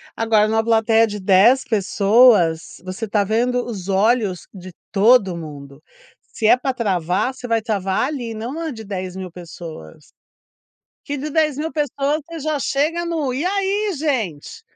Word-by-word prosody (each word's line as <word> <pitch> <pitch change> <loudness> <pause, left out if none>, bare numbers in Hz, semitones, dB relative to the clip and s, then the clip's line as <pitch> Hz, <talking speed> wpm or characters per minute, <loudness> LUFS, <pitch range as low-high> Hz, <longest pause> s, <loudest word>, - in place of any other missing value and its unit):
Agora 220 -2 +2
numa 220 +1 +1
plateia 225 0 +3
de 210 -1 -6
10 200 +8 +4
pessoas, 200 -6 +3
você 185 +4 -5
está 205 -1 +1
vendo 245 +4 0
os 200 -6 -7
olhos 200 -1 +1
de 185 -2 -11 0.2
todo 200 -3 +4
mundo. 145 -3 -10 0.5
Se 220 - 0
é 245 - +6
pra 265 +1 -2
travar 190 0 -1
você 250 - -8
vai 230 -1 +1
travar 205 0 -1
ali, 250 -6 -5
e - - -5
não 225 +3 -5
na 325 -1 -4
de 220 -2 -9
10.000 185 -2 -6
pessoas. 165 - -11 1.0
Que 290 -1 -3
de 295 +3 -5
10.000 310 0 0
pessoas 295 0 -1
você 335 -1 -8
já 305 0 -1
chega 310 +6 0
no, 315 -6 -2
e 280 +7 -2
aí 395 +2 0
gente? 235 - -3
225 Hz, 160 wpm, -20 LUFS, 190-275 Hz, 1.0 s, é